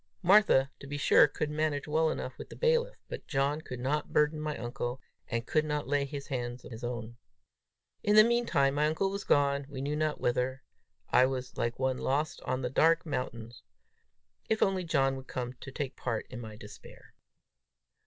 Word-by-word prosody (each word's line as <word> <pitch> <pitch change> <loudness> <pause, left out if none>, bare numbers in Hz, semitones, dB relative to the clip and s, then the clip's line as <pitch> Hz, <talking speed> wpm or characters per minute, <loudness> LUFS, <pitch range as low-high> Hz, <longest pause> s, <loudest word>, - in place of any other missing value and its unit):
Martha, 180 -8 +5
to 140 - -10
be 145 +1 -4
sure, 145 - +6
could 150 +1 -3
manage 150 -1 -1
well 160 +1 +2
enough - - -4
with - - -8
the - - -10
bailiff, 480 +1 +1
but - - -7
John 140 +3 0
could 130 -5 -7
not 145 +4 -1
burden 150 +1 +2
my 150 -1 -3
uncle, 120 +1 -4 0.3
and 115 0 -2
could 155 +2 +2
not 150 -1 -2
lay 140 0 +1
his 140 0 -6
hands 125 -2 -4
on - - -10
his 110 +1 -8
own! 120 -1 -5 0.8
In 210 - +2
the 215 - +10
mean 235 +1 +2
time 135 0 +3
my 150 +1 +2
uncle 175 +5 0
was 200 0 -4
gone 140 -4 +2
we 140 -2 -7
knew 145 +2 -2
not 155 0 -1
whither! 125 +2 -1 0.5
I 130 - +6
was 130 -1 -4
like 120 0 -1
one 130 -1 0
lost 150 +5 -1
on 130 0 -1
the 125 - -1
dark 165 +4 +4
mountains. 120 -5 -5 0.9
If 220 - +3
only 190 -1 +1
John 135 -5 +1
would 130 0 -10
come 125 -1 -4
to 135 - -9
take 135 -1 -4
part 120 -3 -3
in 125 -2 -6
my 110 -2 -8
despair! - - -13
140 Hz, 195 wpm, -30 LUFS, 130-155 Hz, 0.9 s, the